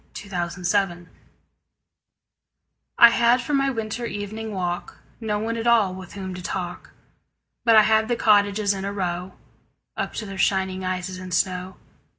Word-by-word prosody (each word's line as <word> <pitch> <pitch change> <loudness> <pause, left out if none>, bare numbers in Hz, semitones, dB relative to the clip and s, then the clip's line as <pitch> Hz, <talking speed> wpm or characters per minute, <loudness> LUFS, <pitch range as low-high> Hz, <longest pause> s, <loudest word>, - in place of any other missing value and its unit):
Good 200 -1 -12
Hours 175 +2 -2 2.2
I 235 - +10
HAD 235 +1 +4
for 250 +4 -4
my 275 -1 +2
winter 230 -1 -3
evening 215 +2 -5
walk 180 -3 -4 0.2
No 215 -2 -1
one 225 +2 -2
at 230 +1 -2
all 220 -6 +4
with 185 -1 -10
whom 190 -2 -6
to 180 - -7
talk, 175 0 -5 0.8
But 230 -1 +6
I 215 - +8
had 220 +1 +3
the 240 - +1
cottages 205 -2 +3
in 190 -1 -5
a 200 - -2
row 180 -2 -3 0.6
Up - - -3
to 220 - -4
their 195 -1 -7
shining 190 -1 +1
eyes 185 0 -3
in 185 0 -8
snow. 180 +1 -1
200 Hz, 160 wpm, -24 LUFS, 185-220 Hz, 2.2 s, I